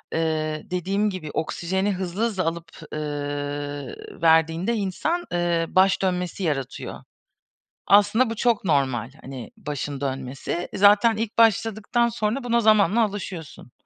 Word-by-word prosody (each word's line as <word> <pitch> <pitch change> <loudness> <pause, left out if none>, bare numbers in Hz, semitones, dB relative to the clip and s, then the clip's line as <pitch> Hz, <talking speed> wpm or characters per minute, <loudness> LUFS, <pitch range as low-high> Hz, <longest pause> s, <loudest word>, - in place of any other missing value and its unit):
ııı, 155 -1 -1
dediğim 195 +4 0
gibi 180 -6 -6
oksijeni 190 +5 -1
hızlı 185 +2 -4
hızlı 200 -5 -1
alıp, 165 0 -3 0.2
ııı, 145 -2 -4 0.3
verdiğinde 165 +6 +3
insan, 265 - -1
ııı, 175 -1 +1
baş 190 +1 +4
dönmesi 180 0 -1
yaratıyor. 135 -6 -3 0.8
Aslında 205 +4 +5
bu 225 - -3
çok 230 -2 +1
normal 130 - +1
hani 130 - -8
başın 145 - -5
dönmesi. 135 +5 -3
Zaten 210 +3 +5
ilk 225 0 -3
başladıktan 225 +1 +3
sonra 230 +3 -2
buna 235 -1 +2
zamanla 215 0 +4
alışıyorsun. 190 - -6
180 Hz, 120 wpm, -24 LUFS, 150-210 Hz, 0.8 s, Aslında